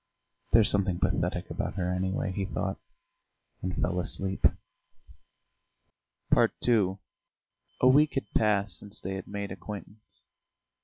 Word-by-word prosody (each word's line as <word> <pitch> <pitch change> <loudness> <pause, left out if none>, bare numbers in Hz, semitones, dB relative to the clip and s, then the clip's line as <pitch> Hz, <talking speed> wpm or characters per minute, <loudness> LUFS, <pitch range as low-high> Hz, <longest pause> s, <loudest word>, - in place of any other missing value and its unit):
"There's 110 -1 +6
something 95 -3 +1
pathetic 90 0 -1
about - - -3
her, 90 -2 -1
anyway," 95 +1 -1
he 95 +1 -2
thought, 95 - -3 0.8
and 90 0 -3
fell 90 0 0
asleep. 95 +2 +1 1.9
II 100 -6 +2 0.8
A 130 - +6
week 145 +4 +5
had 135 - -2
passed 105 -1 +2
since 105 +1 -10
they 95 - -4
had 95 -1 -6
made 100 -1 -4
acquaintance. 105 +2 -9
95 Hz, 115 wpm, -29 LUFS, 95-105 Hz, 1.9 s, There's